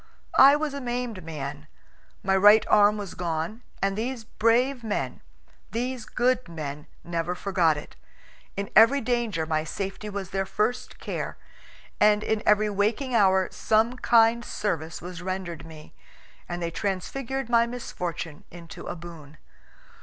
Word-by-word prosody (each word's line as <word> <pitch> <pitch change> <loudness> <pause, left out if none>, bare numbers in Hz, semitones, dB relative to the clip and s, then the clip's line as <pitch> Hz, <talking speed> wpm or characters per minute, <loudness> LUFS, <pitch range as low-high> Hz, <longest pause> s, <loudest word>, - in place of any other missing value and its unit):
I 275 +2 +9
was 300 -1 -2
a 280 - -5
maimed 240 -5 -3
man; 150 -2 -6 0.6
my 190 0 +2
right 205 +3 +7
arm 210 0 +5
was 200 -4 -6
gone; 170 +6 -3 0.2
and 195 0 +1
these 235 +2 -3
brave 240 +4 +1
men, 215 -2 -3 0.5
these 245 0 -3
good 250 -3 0
men, 150 -3 -6 0.2
never 170 +1 -2
forgot 175 -5 +2
it. 150 - -9 0.6
In 200 0 -3
every 230 +6 +7
danger 230 -9 -1
my 155 -1 0
safety 195 +6 -5
was 195 -2 -5
their 195 0 -1
first 240 +6 -1
care, - - -5 0.6
and 210 0 +4
in 220 -1 0
every 210 0 +5
waking 215 +6 0
hour 190 -4 +4
some 225 +3 +2
kind 235 -1 +4
service 165 -9 -3
was 180 -1 -7
rendered 185 -3 -5
me, 155 -1 -13 0.6
and 175 0 -3
they 170 - -2
transfigured 230 +8 -3
my 235 -1 +4
misfortune 175 -10 -5
into 170 -1 -10
a - - -4
boon. 160 -3 -11
205 Hz, 145 wpm, -26 LUFS, 170-235 Hz, 0.6 s, I